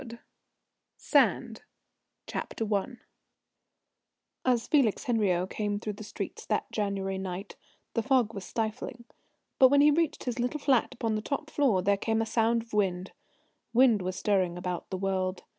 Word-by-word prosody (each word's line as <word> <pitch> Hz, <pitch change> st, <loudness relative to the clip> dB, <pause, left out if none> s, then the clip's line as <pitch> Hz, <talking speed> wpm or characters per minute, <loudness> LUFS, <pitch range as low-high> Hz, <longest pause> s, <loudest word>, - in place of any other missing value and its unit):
Sand -, -, +2 dB, 0.7 s
I -, -, 0 dB, 2.0 s
As 245 Hz, -2 st, +1 dB
Felix 270 Hz, -9 st, +2 dB
Henriot 195 Hz, -8 st, +1 dB
came 205 Hz, -1 st, -2 dB
through 210 Hz, 0 st, -4 dB
the 210 Hz, -, -9 dB
streets 210 Hz, -, -6 dB
that -, -, -1 dB
January 195 Hz, -2 st, -2 dB
night 190 Hz, +1 st, -6 dB, 0.4 s
the 230 Hz, -, +1 dB
fog 250 Hz, -3 st, +2 dB
was 195 Hz, -3 st, -6 dB
stifling, 230 Hz, +3 st, -4 dB, 0.5 s
but 260 Hz, -, +9 dB
when 285 Hz, +1 st, +5 dB
he 295 Hz, +1 st, +6 dB
reached 325 Hz, +1 st, 0 dB
his 245 Hz, -1 st, -3 dB
little 250 Hz, +5 st, -1 dB
flat 265 Hz, -3 st, +2 dB
upon 225 Hz, -2 st, -1 dB
the 215 Hz, -, -1 dB
top 295 Hz, +6 st, -4 dB
floor 235 Hz, -11 st, +2 dB
there 200 Hz, +1 st, +3 dB
came 220 Hz, +2 st, 0 dB
a 225 Hz, -, +1 dB
sound 230 Hz, +1 st, +1 dB
of 230 Hz, -, -21 dB
wind. 190 Hz, -3 st, 0 dB, 0.6 s
Wind 240 Hz, -5 st, +5 dB
was 185 Hz, 0 st, -3 dB
stirring 185 Hz, -4 st, +1 dB
about 180 Hz, -1 st, -4 dB
the 190 Hz, -, -3 dB
world. 185 Hz, -1 st, -1 dB
215 Hz, 150 wpm, -29 LUFS, 195-245 Hz, 2.0 s, but